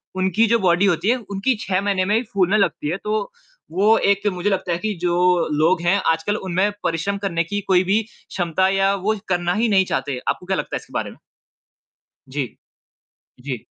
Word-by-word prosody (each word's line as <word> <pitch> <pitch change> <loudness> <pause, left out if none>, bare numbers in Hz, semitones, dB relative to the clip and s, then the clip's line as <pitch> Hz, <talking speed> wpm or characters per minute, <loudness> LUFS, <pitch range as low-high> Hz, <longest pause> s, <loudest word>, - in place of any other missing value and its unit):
उनकी 190 +4 +2
जो 230 +1 +3
बॉडी 180 0 +3
होती 195 +2 +1
है 250 - +3
उनकी 200 +6 0
6 190 0 0
महीने 195 -2 0
में 205 +3 +1
ही 225 - +2
फूलने 195 +1 +3
लगती 200 -7 0
है, 175 - -1
तो 210 0 -3 0.4
वो 205 +6 +4
एक 200 +1 +1
मुझे 180 +3 -1
लगता 185 -2 -1
है 170 - +1
कि 215 +2 -2
जो 175 -1 +1 0.4
लोग 160 +4 +2
हैं 175 +3 +2
आजकल 165 +6 -1
उनमें 190 +2 0
परिश्रम 185 +5 -1
करने 190 -4 -1
की 205 +5 -3
कोई 185 -1 +4
भी 200 +4 +2
क्षमता 180 -3 -1
या 195 0 +2
वो 200 +3 0
करना 175 -1 +1
ही 225 +3 +1
नहीं 190 -2 +4
चाहते। 140 -7 -2
आपको - - -1
क्या 190 0 -1
लगता - - -3
है - - -2
इसके - - -18
बारे - - -2
में? - - -16 1.1
जी। 135 -1 -2 1.0
जी। 135 -2 -3
190 Hz, 200 wpm, -21 LUFS, 175-205 Hz, 1.1 s, वो